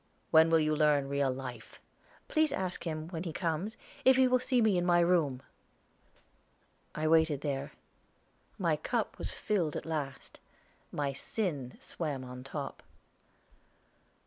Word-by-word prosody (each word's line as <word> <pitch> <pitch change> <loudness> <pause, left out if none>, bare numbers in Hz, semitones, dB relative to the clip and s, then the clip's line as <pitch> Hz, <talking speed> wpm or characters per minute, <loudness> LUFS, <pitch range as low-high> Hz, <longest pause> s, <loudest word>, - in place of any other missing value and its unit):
"When 160 0 +7
will 165 - +5
you 155 0 +2
learn 150 -2 +3
real 140 -1 +1
life?" 130 -1 -7 0.5
"Please 315 -2 +2
ask 185 -10 -2
him, 155 0 -4
when 165 -3 -4
he 170 -2 -4
comes, 170 +6 -2 0.3
if 260 0 +7
he 260 0 +5
will 255 0 +3
see 255 0 +1
me 220 -4 +4
in 175 - +2
my 175 -1 +4
room." 165 -7 +2 1.5
I 155 +1 0
waited 160 -3 +4
there. 140 -1 -3 0.8
My - - +1
cup - - -2
was - - -3
filled 175 -8 -1
at - - -4
last. 145 -4 -5 0.5
My 140 -2 -1
sin 140 - -3
swam 145 -6 -4
on 125 0 -8
the 135 - -12
top. 140 -3 -5
155 Hz, 145 wpm, -31 LUFS, 140-180 Hz, 1.5 s, When